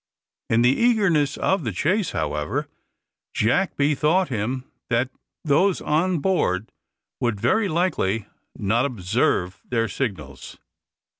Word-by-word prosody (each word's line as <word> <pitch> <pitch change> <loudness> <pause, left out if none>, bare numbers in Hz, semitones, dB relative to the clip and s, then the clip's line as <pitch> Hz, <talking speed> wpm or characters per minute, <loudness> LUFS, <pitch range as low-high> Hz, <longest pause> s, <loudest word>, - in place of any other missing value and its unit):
In 115 +1 +3
the 125 - +5
eagerness 180 - +2
of 190 -3 +1
the 115 - -2
chase, 180 - 0
however, 75 0 -2 0.7
Jack 150 - +1
bethought 150 +5 +2
him 125 +2 -2 0.3
that 120 +2 +1 0.3
those 180 +6 +3
on 170 +4 +1
board 115 - 0 0.5
would 120 -4 -1
very 220 - +2
likely 155 - 0 0.3
not 115 +6 +1
observe 95 -3 -1
their 115 -2 -1
signals. 100 - -5
130 Hz, 115 wpm, -23 LUFS, 110-175 Hz, 0.7 s, the